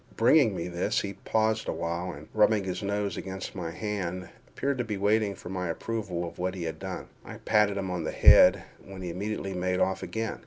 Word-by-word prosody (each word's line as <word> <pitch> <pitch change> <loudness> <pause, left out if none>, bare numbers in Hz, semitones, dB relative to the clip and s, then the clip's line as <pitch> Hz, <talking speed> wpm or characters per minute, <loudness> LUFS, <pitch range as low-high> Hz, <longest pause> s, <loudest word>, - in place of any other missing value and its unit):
Bringing - - +5
me 85 - -3
this, 90 +5 0
he 100 -1 -4
paused 110 +2 0
awhile, 85 +2 -2
and, 75 +2 -11
rubbing 105 -1 +4
his 90 -1 -4
nose 100 -2 -2
against 95 0 -6
my 85 -3 -4
hand, 90 -1 -4 0.2
appeared 140 -1 -2
to - - +1
be 105 -3 -4
waiting 105 0 +2
for 90 - -10
my 90 -1 -3
approval 90 -2 -3
of 85 - -11
what 90 +1 -1
he 90 - -5
had 80 -1 -4
done. - - -6 0.2
I - - -9
patted 105 -2 +2
him 95 -2 -3
on 90 -2 -2
the - - -2
head, - - +7 0.2
when 95 -1 -9
he 90 - -3
immediately 100 +1 -3
made 90 0 -1
off 95 0 +1
again. 110 -1 -3
95 Hz, 210 wpm, -28 LUFS, 90-105 Hz, 0.2 s, head